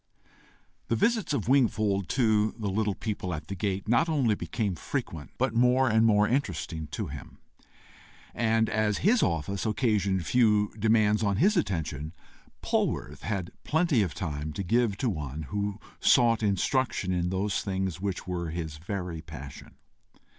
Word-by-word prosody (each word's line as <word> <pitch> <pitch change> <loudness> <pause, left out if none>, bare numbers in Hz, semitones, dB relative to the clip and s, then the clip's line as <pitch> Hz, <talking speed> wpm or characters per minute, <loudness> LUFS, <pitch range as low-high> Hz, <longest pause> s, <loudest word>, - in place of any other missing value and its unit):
The 115 - +1
visits 220 - +1
of 120 -9 -1
Wingfold 110 -8 +2
to 110 -4 +2
the 105 -4 -2
little 105 0 0
people 95 -5 -3
at 75 - -9
the 100 - -3
gate 100 +1 -2
not 120 +8 +3
only 135 -8 +2
became 105 -1 -2
frequent, 85 - -5
but - - 0
more 125 +2 +4
and 110 -1 +4
more 105 -1 +4
interesting 90 - -2
to - - -4
him, - - -9 1.0
and 110 -1 +2
as 110 -2 +1
his 230 +4 +5
office 85 +3 -1
occasioned 105 -6 +1
few 105 -3 +3
demands 110 -1 +3
on 100 -2 +1
his 205 +6 +4
attention, 80 - -2 0.5
Polwarth 75 +2 -1
had 95 -5 -3
plenty 160 -6 +2
of 90 -6 -2
time 75 -3 -4
to 100 - -3
give 115 +1 +1
to 130 - -1
one 75 - -3
who 100 +4 -3 0.2
sought 115 -3 +4
instruction 105 0 0
in 90 -1 0
those 95 +2 -1
things 95 -3 -3
which 100 -2 -3
were 90 -2 -3
his 80 -2 -5
very 90 -2 -5
passion. 70 -4 -10
105 Hz, 155 wpm, -28 LUFS, 90-115 Hz, 1.0 s, his